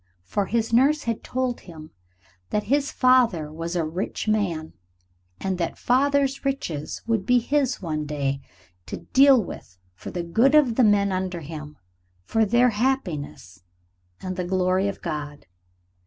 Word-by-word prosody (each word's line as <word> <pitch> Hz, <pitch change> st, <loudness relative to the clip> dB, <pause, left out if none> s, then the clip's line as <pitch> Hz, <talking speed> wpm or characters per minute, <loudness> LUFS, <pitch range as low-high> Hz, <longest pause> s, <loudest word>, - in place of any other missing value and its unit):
For 200 Hz, -, -2 dB
his 230 Hz, +2 st, -1 dB
nurse 285 Hz, +5 st, +4 dB
had 230 Hz, -2 st, -3 dB
told 255 Hz, -1 st, -2 dB
him 160 Hz, -3 st, -12 dB, 0.6 s
that 210 Hz, -, 0 dB
his 280 Hz, 0 st, 0 dB
father 235 Hz, -12 st, +3 dB
was 165 Hz, +2 st, -4 dB
a 170 Hz, -2 st, 0 dB
rich 175 Hz, +7 st, -4 dB
man; 180 Hz, -7 st, -1 dB, 0.7 s
and 190 Hz, -1 st, -2 dB
that 170 Hz, -, -2 dB
father's 275 Hz, +1 st, +1 dB
riches 175 Hz, -, -3 dB
would 225 Hz, -3 st, 0 dB
be 250 Hz, +5 st, +3 dB
his 260 Hz, -2 st, 0 dB
one 155 Hz, -3 st, -3 dB
day, 140 Hz, -2 st, -2 dB, 0.5 s
to -, -, -5 dB, 0.2 s
deal 270 Hz, -1 st, +7 dB
with 90 Hz, -, -10 dB, 0.2 s
for 90 Hz, -, -9 dB
the 175 Hz, -, -4 dB
good 230 Hz, -, +3 dB
of 280 Hz, -6 st, +5 dB
the 250 Hz, -, +3 dB
men 205 Hz, -2 st, +3 dB
under 185 Hz, -2 st, -2 dB
him, 150 Hz, -1 st, -8 dB, 0.5 s
for 220 Hz, -, +1 dB
their 240 Hz, +4 st, +4 dB
happiness 180 Hz, -, -2 dB, 0.6 s
and 185 Hz, -1 st, -5 dB
the 180 Hz, -, -1 dB
glory 185 Hz, +1 st, +1 dB
of 200 Hz, -, -5 dB
God. 150 Hz, -1 st, -5 dB
195 Hz, 155 wpm, -24 LUFS, 160-250 Hz, 0.7 s, deal